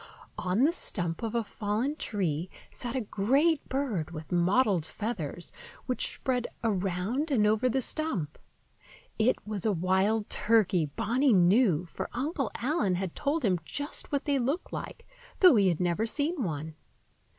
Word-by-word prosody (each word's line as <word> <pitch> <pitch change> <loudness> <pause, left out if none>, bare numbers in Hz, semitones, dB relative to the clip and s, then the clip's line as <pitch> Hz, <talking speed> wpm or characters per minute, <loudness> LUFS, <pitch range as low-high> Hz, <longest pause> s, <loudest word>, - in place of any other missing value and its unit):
On 185 +7 +1
the 305 - +5
stump 175 - -2
of 225 0 -3
a 235 - +1
fallen 220 +7 -2
tree 180 - -2 0.2
sat 245 0 -5
a 260 - 0
great 270 +10 +2
bird 250 - -1
with 155 -1 -9
mottled 185 +1 +3
feathers, 175 -4 -4 0.3
which 255 - -1
spread 250 -2 -1 0.2
around 200 - -1
and 235 -7 +3
over 220 +4 +3
the 260 +2 0
stump. 225 - -2 0.8
It 230 +4 +4
was 210 -3 -3
a 220 - +3
wild 190 +4 +1
turkey, 205 -7 +2
Bonny 230 - +1
knew, 185 - +4
for 170 - -6
Uncle 275 -1 -1
Allen 235 - 0
had 185 -1 -3
told 290 -1 0
him 185 -4 +2
just 285 +1 -4
what 285 -2 -1
they 280 -2 +2
looked 275 +9 -2
like, - - -6 0.3
though 365 -7 +8
he 200 -3 +4
had 170 -4 +1
never 180 +5 0
seen 295 +6 -1
one. 160 -5 -3
215 Hz, 155 wpm, -29 LUFS, 180-260 Hz, 0.8 s, though